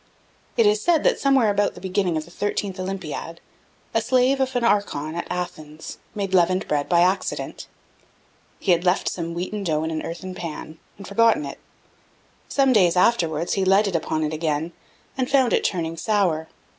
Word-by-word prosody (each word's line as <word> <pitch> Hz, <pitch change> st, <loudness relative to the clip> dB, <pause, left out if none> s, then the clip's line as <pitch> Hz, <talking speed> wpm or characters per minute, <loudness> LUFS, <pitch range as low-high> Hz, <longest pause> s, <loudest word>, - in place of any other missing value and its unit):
It 230 Hz, -, +5 dB
is 210 Hz, 0 st, +3 dB
said, 325 Hz, +4 st, +2 dB
that -, -, +2 dB
somewhere 265 Hz, -6 st, +3 dB
about 205 Hz, 0 st, 0 dB
the -, -, -10 dB
beginning 185 Hz, -2 st, 0 dB
of 155 Hz, -, -4 dB
the 170 Hz, -, -16 dB
thirtieth 205 Hz, 0 st, -3 dB
Olympiad, 185 Hz, -3 st, -5 dB, 0.5 s
the -, -, +2 dB
slave 260 Hz, +1 st, +2 dB
of 265 Hz, -1 st, -1 dB
an 245 Hz, -, +1 dB
archon, 200 Hz, -9 st, 0 dB
at 170 Hz, -, -4 dB
Athens, 160 Hz, -4 st, -6 dB, 0.2 s
made 195 Hz, -2 st, -3 dB
leavened 185 Hz, +1 st, +3 dB
bread 145 Hz, -1 st, -1 dB
by 170 Hz, -1 st, +4 dB
accident. 185 Hz, +2 st, -1 dB, 0.9 s
He 190 Hz, -, +1 dB
had 170 Hz, 0 st, +3 dB
left 180 Hz, +1 st, +1 dB
some 170 Hz, -1 st, -3 dB
wheaten 190 Hz, +4 st, -3 dB
dough 155 Hz, -4 st, 0 dB
in 160 Hz, -, -2 dB
an 155 Hz, -1 st, -2 dB
earthen 185 Hz, +3 st, -6 dB
pan, 160 Hz, -2 st, -7 dB, 0.2 s
and 195 Hz, -, -10 dB
forgotten 225 Hz, -5 st, +3 dB
it; 140 Hz, -, -8 dB, 0.9 s
some 270 Hz, -2 st, +3 dB
days 180 Hz, -5 st, +4 dB
afterwards, 170 Hz, -6 st, +2 dB
he 195 Hz, -, +1 dB
lighted 195 Hz, 0 st, +3 dB
upon 155 Hz, -1 st, -1 dB
it 155 Hz, 0 st, -2 dB
again, 155 Hz, +1 st, -1 dB, 0.5 s
and 255 Hz, -, 0 dB
found 260 Hz, -4 st, +3 dB
it -, -, +2 dB
turning 165 Hz, -2 st, -2 dB
sour. 175 Hz, -5 st, 0 dB
185 Hz, 180 wpm, -23 LUFS, 165-210 Hz, 0.9 s, It